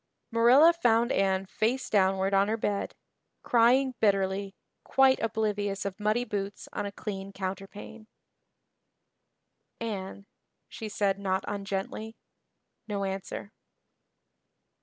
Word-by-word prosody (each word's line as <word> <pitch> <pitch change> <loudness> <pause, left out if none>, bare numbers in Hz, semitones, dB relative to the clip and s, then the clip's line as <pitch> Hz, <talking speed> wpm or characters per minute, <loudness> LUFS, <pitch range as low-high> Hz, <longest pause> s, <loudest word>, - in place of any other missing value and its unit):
Marilla 250 +9 +6
found 240 -6 +2
Anne 195 -2 +1
face 235 +7 -1
downward 190 -1 +2
on 195 +1 +4
her 220 +1 0
bed, 205 -2 -2 0.5
crying 250 +3 +4
bitterly, 195 -1 +1 0.3
quite 265 0 +4
oblivious 205 -3 -1
of 200 +1 -4
muddy 215 +3 +1
boots 200 -2 -4
on 205 - -2
a - - -6
clean 195 -1 -6
counterpane. 195 +3 -7 1.7
"Anne," 200 -3 -5 0.4
she 220 -2 -7
said 200 -1 0
not 190 -1 -1
ungently. 200 +2 -4 0.7
No 200 -2 -2
answer. 195 +1 -5
205 Hz, 105 wpm, -28 LUFS, 195-225 Hz, 1.7 s, Marilla